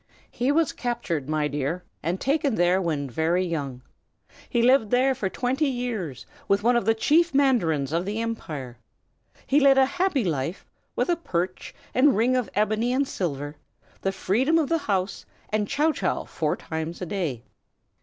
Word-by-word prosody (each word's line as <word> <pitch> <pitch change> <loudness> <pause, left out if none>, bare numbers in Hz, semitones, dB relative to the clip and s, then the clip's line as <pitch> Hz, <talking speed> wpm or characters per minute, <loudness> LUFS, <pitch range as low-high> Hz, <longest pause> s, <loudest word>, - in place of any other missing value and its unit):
"He 250 +3 0
was 320 +1 +2
captured, 190 - -3
my 155 -1 +1
dear, 145 +5 -2 0.2
and 170 +4 -2
taken 280 -2 +1
there 175 +1 +3
when 155 -5 -1
very 165 +8 +1
young. 140 -7 -4 0.7
He 235 -3 +1
lived 250 -3 +4
there 255 +3 +3
for 205 -6 -2
twenty 260 - 0
years, 230 - -3 0.2
with 200 +1 +2
one 240 +2 +4
of 235 - +1
the 225 +1 +3
chief 315 +6 +3
mandarins 170 - +2
of 165 +2 0
the 210 +3 -3
empire. 150 - -5 0.7
He 280 - +3
led 275 -1 +5
a 265 - +6
happy 350 -2 0
life, 165 0 -2 0.3
with - - 0
a 345 - +4
perch 185 - -3 0.2
and 265 -4 +4
ring 245 +4 +3
of 250 -5 0
ebony 215 +3 +1
and 270 +2 +1
silver, 145 - -3 0.4
the 195 - 0
freedom 245 - +1
of 310 -4 +1
the 330 - +2
house, 195 -8 -1 0.3
and 210 -1 0
chow 305 +7 +2
chow - - -1
four - - -2
times 160 +1 -5
a 180 - -3
day. 160 - -3
210 Hz, 175 wpm, -25 LUFS, 165-260 Hz, 0.7 s, a